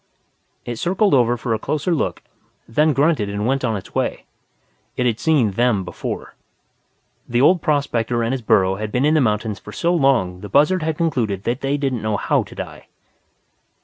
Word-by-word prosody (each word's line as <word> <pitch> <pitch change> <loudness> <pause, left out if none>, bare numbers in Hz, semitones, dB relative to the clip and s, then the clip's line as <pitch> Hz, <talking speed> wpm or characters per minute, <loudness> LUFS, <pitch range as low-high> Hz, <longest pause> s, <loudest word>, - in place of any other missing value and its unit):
It 120 -1 -4
circled 190 - +1
over 120 -2 +3
for 115 0 -2
a 110 - -1
closer 155 +8 -1
look, 160 - -2 0.4
then 150 +7 +2
grunted 140 -7 +1
and 100 +1 -3
went 135 +2 0
on 115 -4 0
its 95 - -11
way. - - -2 0.7
It 125 - 0
had 115 -2 0
seen 145 -10 +2
them 115 -1 +1
before. - - -6 1.0
The 120 0 +1
old 170 +6 +4
prospector 120 -6 0
and 115 - -1
his 135 -1 -2
burro 95 -3 +2
had 105 0 -4
been 125 +4 +1
in 150 - +3
the 155 - +4
mountains 105 -3 -1
for 105 - -11
so 170 - 0
long 130 - +2
the 105 - -8
buzzard 160 +6 +3
had 155 0 -2
concluded 115 - -1
they 135 +5 -1
didn't 135 -5 -2
know 110 -1 -1
how - - +1
to - - -10
die. - - -8
125 Hz, 185 wpm, -20 LUFS, 110-150 Hz, 1.0 s, old